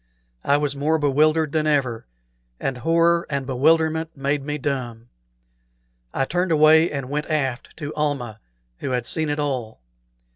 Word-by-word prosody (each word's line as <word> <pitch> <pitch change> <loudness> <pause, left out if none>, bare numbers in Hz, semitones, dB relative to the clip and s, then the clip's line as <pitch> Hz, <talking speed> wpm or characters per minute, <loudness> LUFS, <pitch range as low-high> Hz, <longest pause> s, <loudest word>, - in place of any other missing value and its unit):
I 140 - +3
was 145 -1 -1
more 150 +3 +1
bewildered 155 +1 +2
than 155 0 0
ever, 130 - 0 0.5
and 135 -2 -3
horror 170 +4 +2
and 140 -2 -2
bewilderment 160 +4 +2
made 140 +1 -1
me 150 +1 -3
dumb. 120 -5 -4 1.0
I 135 - 0
turned 180 +4 -1
away 160 +1 +5
and 140 -3 -4
went 150 +2 -3
aft 135 -5 -2
to 150 -2 -5
Almah, 140 -7 -2 0.4
who - - -4
had 125 -2 -1
seen 155 +3 -1
it 145 - -1
all. 130 - -3
145 Hz, 150 wpm, -22 LUFS, 135-155 Hz, 1.0 s, away